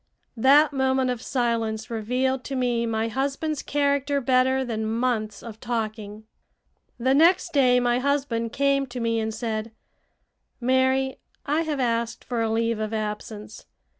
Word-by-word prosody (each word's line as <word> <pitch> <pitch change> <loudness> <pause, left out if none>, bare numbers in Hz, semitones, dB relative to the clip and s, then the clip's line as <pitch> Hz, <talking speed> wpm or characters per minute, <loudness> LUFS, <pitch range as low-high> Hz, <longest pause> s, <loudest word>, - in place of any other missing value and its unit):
That 285 +5 +5
moment 265 -1 +1
of 245 -2 -4
silence 230 -3 -1
revealed 250 +4 -1
to 275 - -4
me 240 -2 0
my 225 0 -1
husband's 275 +5 -2
character 280 0 0
better 260 +1 +2
than 220 -2 -3
months 220 -2 -1
of 220 -2 -9
talking. 215 -3 -4 0.7
The 260 +2 +2
next 335 +4 +4
day 250 -3 +4
my 245 0 +1
husband 260 -4 -1
came 275 0 +1
to 245 0 -6
me 230 -1 0
and 220 0 -2
said: 220 0 -4 0.9
"Mary, 260 +1 +1 0.3
I 300 +3 +1
have 310 -4 -2
asked 230 -2 -1
for 240 -2 -2
a 225 - 0
leave 230 0 0
of 215 +1 -2
absence. 210 0 -6
245 Hz, 145 wpm, -25 LUFS, 225-265 Hz, 0.9 s, That